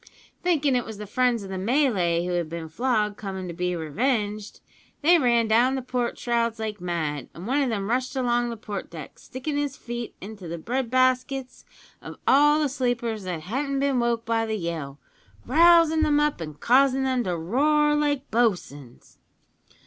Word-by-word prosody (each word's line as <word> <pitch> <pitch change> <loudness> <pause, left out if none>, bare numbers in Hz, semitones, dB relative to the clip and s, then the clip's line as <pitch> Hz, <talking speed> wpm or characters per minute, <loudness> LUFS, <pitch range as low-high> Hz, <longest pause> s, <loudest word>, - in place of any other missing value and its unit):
Thinking 300 -7 +2
it 245 - +1
was 220 -2 -8
the 210 - -7
friends 240 +1 +1
of 195 - -8
the 190 - -3
Malay 190 - +1
who 180 - -2
had 175 -3 -1
been 165 -1 -6
flogged 210 +1 0
coming 190 -3 -5
to 170 - -6
be 180 +1 -2
revenged, 210 - -2 0.4
they 340 +3 +6
ran 235 -4 +3
down 240 +4 +3
the 265 - -3
port 245 -1 -2
shrouds 235 -1 0
like 215 -3 -5
mad, 155 -6 -3
and 170 - -8
one 270 +5 +1
o' 270 - +1
them 200 -3 -2
rushed 255 +4 -1
along 240 -2 +1
the 230 - -5
port 205 -3 -6
deck, 160 -4 -10
stickin' 285 +3 -5
his 285 -2 -2
feet 240 -1 -6
into 200 -2 -9
the 170 +1 -5
bread 240 +8 -2
baskets 255 +1 0 0.4
of - - -9
all 295 +2 +5
the 300 - +2
sleepers 240 -6 -2
that 175 -3 -4
hadn't 275 - -2
been 275 -2 +1
woke 235 -1 0
by 225 0 +1
the 220 -1 -2
yell, 160 -6 -5 0.5
rousin' 330 +2 +5
them 300 -2 +3
up 295 -10 0
an' 155 -2 -6
causin' 265 - +3
them 260 -2 0
to 180 -2 -1
roar 295 - +2
like 290 -2 0
bo'suns. 175 - -2
235 Hz, 185 wpm, -25 LUFS, 190-265 Hz, 0.5 s, they